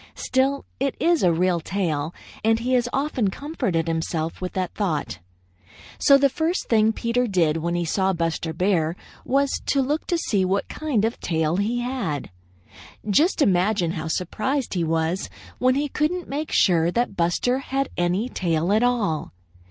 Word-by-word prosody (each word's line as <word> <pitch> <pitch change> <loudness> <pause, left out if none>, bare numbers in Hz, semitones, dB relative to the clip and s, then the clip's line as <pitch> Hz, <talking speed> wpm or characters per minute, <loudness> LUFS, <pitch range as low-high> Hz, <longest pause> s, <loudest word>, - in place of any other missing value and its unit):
Still, 270 +2 0
it 275 0 0
is 340 -1 +3
a 180 - +4
real 175 +1 +1
tail, 165 -4 -2 0.3
and 225 +1 +3
he 245 +3 -1
has 245 -1 +2
often 270 -7 0
comforted 200 - -2
himself 165 0 -2
with 185 - -4
that 185 -2 -2
thought. 170 - -2 0.8
So 280 -2 +6
the 280 0 +4
first 320 +6 -1
thing 220 -1 +4
Peter 235 +2 0
did 170 -6 +2
when 170 +2 -2
he 175 0 0
saw 190 +3 +1
Buster 165 -2 -2
Bear 170 -1 +1 0.3
was 275 +1 +1
to 280 - +2
look 290 +4 -1
to 345 - +1
see 205 - 0
what 190 +2 0
kind 275 -9 -1
of 225 - 0
a - - -21
tail 160 0 0
he 225 +5 0
had. 240 - -3 0.8
Just 300 - +3
imagine 185 -3 +2
how 160 -2 -4
surprised 230 - -2
he 175 -3 0
was 165 +3 -1 0.3
when 255 +1 +3
he 290 +2 0
couldn't 315 +5 -1
make 300 +3 -3
sure 170 -3 +3
that 235 +2 -1
Buster 180 +9 +1
had 275 0 -2
any 180 +6 0
tail 170 -5 0
at 215 - +3
all. 230 -11 0
200 Hz, 170 wpm, -23 LUFS, 170-260 Hz, 0.8 s, So